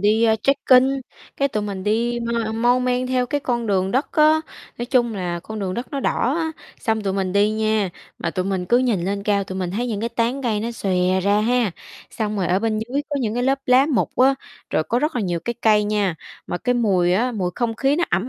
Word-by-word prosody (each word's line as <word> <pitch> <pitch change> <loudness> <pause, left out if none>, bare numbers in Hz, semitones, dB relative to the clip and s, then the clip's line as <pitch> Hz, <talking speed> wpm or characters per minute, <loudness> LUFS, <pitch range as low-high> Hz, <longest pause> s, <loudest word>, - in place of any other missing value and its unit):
đi, 215 +3 +3
a, 220 -1 +4
trekking, 260 0 +4 0.5
cái 275 - +1
tụi 215 -5 -2
mình 200 -2 -5
đi 235 +3 0
mau 230 -2 -1
mon 245 +3 +2
men 250 0 0
theo 255 -1 0
cái 290 +2 -1
con 240 -3 -1
đường 190 -2 +1
đất 260 +6 -1
á, 310 +1 +5 0.4
nói 240 - -3
chung 240 -3 +2
là 175 -3 -3
con 220 +5 -7
đường 190 -2 -3
đất 240 +2 -4
nó 280 - -2
đỏ 260 +1 0
á. 320 -1 -1 0.3
Xong 220 -1 0
tụi 195 -2 -1
mình 190 -1 -1
đi 205 +2 +3
nha, 215 -2 +1 0.3
mà - - -2
tụi 185 - -2
mình 190 -2 -2
cứ 240 +7 +4
nhìn 230 -9 +1
lên 200 +1 -2
cao, 200 -1 +1
tụi 190 -1 -6
mình 180 -2 -2
thấy 230 +6 -2
những 215 -4 -3
cái 230 - -1
tán 235 +3 -1
cây 220 -4 0
nó 230 +2 -3
xòe 185 -3 +1
ra 200 +2 +2
ha, 235 -1 +2 0.4
xong 215 -1 -3
rồi 190 -3 0
ở 185 - +2
bên 220 0 -1
dưới 245 +6 -2
có 290 - -1
những 225 -3 -1
cái 245 - -1
lớp 270 +2 +2
lá 255 +2 +5
mục 285 -6 0
á, 265 +2 +5 0.4
rồi - - +1
có 235 +9 0
rất 300 +2 -1
là 235 - 0
nhiều 175 -3 -1
cái 235 +8 -3
cây 210 -1 +4
nha, 205 -4 0 0.3
mà 175 - -3
cái 245 +4 0
mùi 190 -7 +2
á, 240 +7 +1
mùi 185 -5 -1
không 235 -2 -1
khí 275 +5 +1
nó 345 - +2
ẩm 190 +7 0
220 Hz, 255 wpm, -21 LUFS, 200-250 Hz, 0.5 s, á